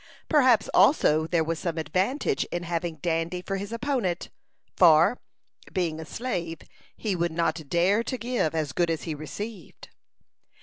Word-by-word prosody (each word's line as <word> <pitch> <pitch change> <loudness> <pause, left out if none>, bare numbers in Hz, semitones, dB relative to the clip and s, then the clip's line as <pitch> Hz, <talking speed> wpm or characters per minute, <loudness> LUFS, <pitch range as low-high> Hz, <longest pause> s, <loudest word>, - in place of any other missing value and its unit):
Perhaps 260 -7 +4
also 160 - +4
there 165 -1 +1
was 165 +1 -2
some 170 -2 -3
advantage 185 - 0
in 175 0 -4
having 170 -1 -2
Dandy 170 +1 -1
for 195 +1 -3
his 200 +2 -6
opponent, 230 -7 -2 0.5
for, 170 +6 +5 0.5
being 165 -4 -1
a 160 - -6
slave, 170 -6 -4 0.4
he 210 -4 -1
would 170 -1 0
not 160 -2 -1
dare 185 +7 +3
to 255 - -3
give 235 -10 -1
as 150 -4 -1
good 175 -1 +1
as 165 -1 -2
he 160 - -3
received. 190 +6 -8
175 Hz, 150 wpm, -26 LUFS, 160-205 Hz, 0.5 s, for